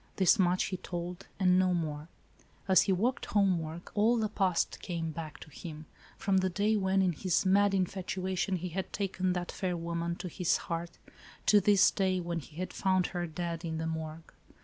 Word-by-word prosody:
This 190 +3 +4
much 180 0 +3
he 185 - -3
told, 175 0 -6
and 185 -1 +4
no 185 -1 +3
more. 155 -2 -3 0.6
As 190 -1 +6
he 195 - +1
talked 225 +8 0
homeward, 175 -5 +1
all 220 +3 +3
the 215 -2 0
past 190 -5 0
came 165 -3 -3
back 155 -1 -7
to 155 - -11
him, 155 0 -8 0.3
from 195 -1 +1
the 185 0 +2
day 205 +4 +1
when, 190 -1 +2
in 185 - +3
his 180 +3 0
mad 200 +1 +4
in 185 -1 +3
fatuation 190 +1 -2
he 180 0 -4
had 185 +3 -4
taken 185 -2 -1
that 175 -1 -3
fair 180 -2 -2
woman 170 0 -2
to 180 - -6
his 175 0 +1
heart, 170 0 -5 0.5
to 205 -1 +6
this 200 0 +5
day, 185 -1 +1
when 170 -1 -3
he 150 0 -13
had 185 +2 -4
found 185 -1 +2
her, 175 -1 -2
dead, 170 +1 -4
in 160 -1 -3
the 160 - -2
morgue. 160 0 -5
180 Hz, 195 wpm, -31 LUFS, 170-190 Hz, 0.6 s, As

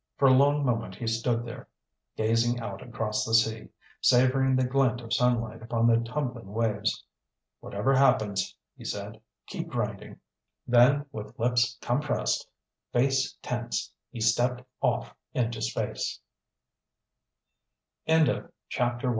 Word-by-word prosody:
For 140 - +5
a 130 - +7
long 145 +2 +4
moment 115 -6 -1
he 120 - -6
stood 115 +1 0
there, 115 - -8 0.5
gazing 115 +2 +2
out 100 -4 -6
across 110 -3 -2
the 115 - +1
sea, 110 -1 +2 0.3
savoring 130 +1 +4
the 130 0 +2
glint 130 -1 +2
of 115 -1 -5
sunlight 120 -3 +1
upon 115 0 0
the 115 -1 +5
tumbling 120 -4 -4
waves. 110 -2 0 0.6
"Whatever 105 +7 0
happens," 105 -8 +2 0.2
he - - -13
said, 105 +2 -5 0.2
"keep - - -5
grinding." - - -4 0.5
Then 125 +4 +5
with 110 +4 -8
lips 120 0 +1
compressed, 145 +5 -1 0.4
face 135 +1 +1
tense, - - -3 0.2
he - - -8
stepped 120 +3 +2 0.2
off - - 0 0.2
into 120 -2 -1
space. - - -2
120 Hz, 120 wpm, -28 LUFS, 110-130 Hz, 0.6 s, a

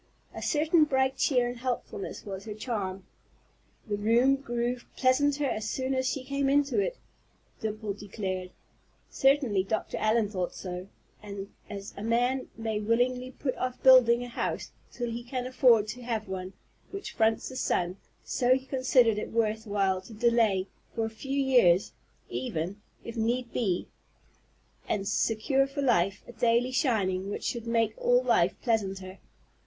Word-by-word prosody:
A - - -7
certain 310 +1 +3
bright 265 -2 +1
cheer 250 -2 +2
and 245 0 -5
helpfulness 245 -5 -4
was 195 -1 -6
her 210 -2 -6
charm. 200 -5 -4 0.8
"The 205 -1 -1
room 235 +6 +4
grew 240 -2 -2 0.2
pleasanter 285 +3 +3
as 215 -4 -2
soon 260 0 -1
as 260 0 +1
she 270 - -3
came 275 +1 0
into 285 +4 +2
it," - - -1 0.6
Dimple 215 -1 -3
declared. 190 -2 -4 0.6
Certainly 270 -8 +3
Dr. 220 +2 -2
Allen 215 0 +2
thought 185 -3 -3
so; 180 0 -6 0.3
and 200 -1 -7 0.2
as 200 -1 -7
a - - -7
man 245 +4 +1
may 220 -2 -2
willingly 245 +4 +1
put 260 0 -3
off 255 0 -3
building 245 -2 +7
a - - -6
house 240 - -3 0.2
till 240 -1 -3
he 235 +1 -4
can 250 +1 -4
afford 245 -4 +4
to 250 - -6
have 230 -3 -3
one 190 0 -5 0.4
which 395 0 -6
fronts 220 -1 +1
the 260 - -9
sun, 180 -7 0 0.3
so 255 0 +2
he 265 0 -4
considered 255 -4 +3
it - - -5
worth 220 -1 0
while 195 -2 +1
to 205 +4 -13
delay, 225 -4 +3 0.3
for 225 - 0
a 225 - -4
few 270 +5 -3
years, 240 -9 +4 0.4
even, 200 -4 -4 0.2
if 230 - -7
need 235 +2 -1
be, 190 -7 0 1.0
and 200 -2 -1
secure 240 +6 +1
for 280 +1 -3
life 195 -6 +2
a - - -8
daily 240 +1 +2
shining 200 - +1
which 205 - -4
should 235 -1 -3
make 230 -1 +2
all - - +3
life - - +3
pleasanter. 195 -5 -1
230 Hz, 160 wpm, -29 LUFS, 205-260 Hz, 1.0 s, building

